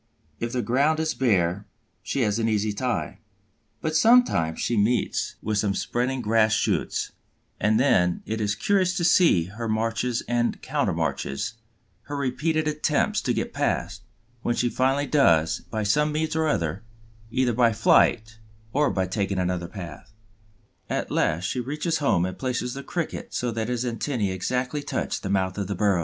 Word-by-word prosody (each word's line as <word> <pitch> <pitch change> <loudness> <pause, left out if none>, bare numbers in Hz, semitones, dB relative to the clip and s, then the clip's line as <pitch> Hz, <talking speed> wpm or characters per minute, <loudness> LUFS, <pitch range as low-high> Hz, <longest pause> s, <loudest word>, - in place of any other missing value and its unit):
If 115 0 -3
the 125 -2 0
ground 145 +6 +2
is 160 0 0
bare, 100 -6 +1 0.3
she 135 - -2
has 105 -1 +1
an 115 0 +1
easy 105 -1 0
time; 125 +3 -2 0.6
but 155 -1 -2
sometimes 220 - +4
she 120 - 0
meets 115 +3 0
with 105 -1 0
some 100 -1 0
spreading 125 +5 -1
grass 110 0 +3
shoots, - - 0 0.5
and 110 +1 +2
then 90 -10 +2
it 110 0 -3
is 105 -1 0
curious 190 - +1
to 175 - 0
see 165 - +5
her 110 +6 -6
marches 115 +2 -1
and 120 0 0
countermarches, 85 - -1 0.5
her 145 0 -4
repeated 150 +4 0
attempts 150 0 +1
to - - -1
get - - -2
past, - - -1 0.4
which 120 - -1
she 120 - +2
finally 135 +3 +1
does 85 - +3
by 110 -1 -2
some 150 +9 +2
means 155 +1 -1
or 160 0 +1
other, 85 - -1 0.5
either 125 +1 +1
by 120 0 +4
flight 110 +1 +3 0.3
or 145 +1 +3
by 95 -1 0
taking 100 +1 -2
another 90 -1 -1
path. 85 -6 -9 0.8
At - - -2
last 80 +2 +1
she 90 +7 -2
reaches 150 +6 -2
home 90 - +2
and 95 - -5
places 125 -1 -2
the 140 - -6
Cricket 165 +4 -4
so 120 -1 -1
that 110 0 -3
his 125 0 -1
antennæ 115 -3 -1
exactly 125 +9 -2
touch 145 - -3
the 95 - -4
mouth 95 0 0
of 100 - -2
the 100 - -3
burrow. 100 -1 +2
115 Hz, 170 wpm, -25 LUFS, 100-140 Hz, 0.8 s, see